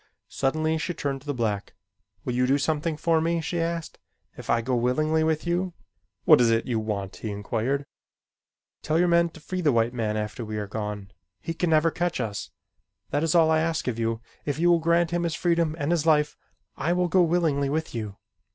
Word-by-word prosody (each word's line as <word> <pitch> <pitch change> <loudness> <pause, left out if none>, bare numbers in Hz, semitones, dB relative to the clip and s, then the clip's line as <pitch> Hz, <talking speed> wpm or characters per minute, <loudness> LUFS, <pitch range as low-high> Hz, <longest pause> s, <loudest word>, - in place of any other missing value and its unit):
Suddenly 155 +4 0
she 175 +2 -3
turned 140 -3 -3
to 145 - -18
the 145 - 0
black. 105 -4 -2 0.5
"Will 125 - -1
you 125 +1 +2
do 135 +2 +3
something 155 +2 -1
for 160 +1 +2
me?" 170 +1 +1
she 165 +2 -2
asked. 165 -1 -3 0.4
"If - - -10
I 115 - +4
go 125 +2 -1
willingly 155 +7 +1
with 160 0 0
you?" 175 +1 -1 0.5
"What - - +7
is 120 - +4
it 115 0 +2
you 120 -3 0
want?" 100 -3 -4
he 110 - -5
inquired. 115 +7 -2 1.0
"Tell 155 +1 0
your 175 +1 +4
men 170 0 +4
to 160 - -14
free 185 +4 -4
the 150 -4 +3
white 115 0 +2
man 110 -3 -1
after 105 +2 -4
we 110 -1 -5
are 105 - -2
gone. 105 -1 -5 0.3
He 165 - -4
can 170 +1 -1
never 160 +1 +4
catch 175 +1 -1
us. 105 -2 -3 0.6
That 145 - +1
is 165 +1 +1
all 160 -2 +5
I 160 - +4
ask 160 -2 -1
of 115 -2 -1
you. 115 0 -1 0.2
If 145 -1 -2
you 175 +2 +4
will 170 - +4
grant 170 +1 +2
him 175 0 0
his 170 -2 -1
freedom 170 -3 +1
and 150 0 -1
his 165 -2 +1
life, 150 -1 +3 0.4
I 160 +5 0
will 180 0 +1
go 185 +2 +4
willingly 160 -5 +2
with 160 +2 -2
you. 105 -4 -5
155 Hz, 215 wpm, -26 LUFS, 115-165 Hz, 1.0 s, What